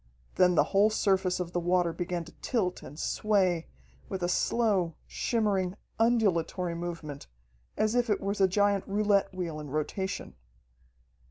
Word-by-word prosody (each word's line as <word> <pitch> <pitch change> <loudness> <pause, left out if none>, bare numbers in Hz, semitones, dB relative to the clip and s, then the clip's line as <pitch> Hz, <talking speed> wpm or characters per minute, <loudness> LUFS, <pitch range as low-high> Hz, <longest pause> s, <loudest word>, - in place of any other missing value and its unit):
Then 180 -1 +4
the - - +5
whole 200 +2 +5
surface 190 -4 +1
of 175 -1 -3
the 175 - +1
water 175 -1 +1
began 175 0 -3
to 165 - -13
tilt 195 -8 -1
and 145 - -11
sway 185 -6 +1 0.4
with 190 -2 -4
a - - +2
slow, 190 -5 +1
shimmering, 200 -5 0 0.2
undulatory 185 -7 +2
movement, 165 -4 -6 0.5
as 215 0 +2
if 245 -1 +1
it 210 - +2
was 200 +1 -2
a 190 - +6
giant 200 +1 +1
roulette 200 -1 +2
wheel 175 -5 -4
in 150 -1 -7
rotation. 155 +7 -3
185 Hz, 150 wpm, -29 LUFS, 175-205 Hz, 0.5 s, a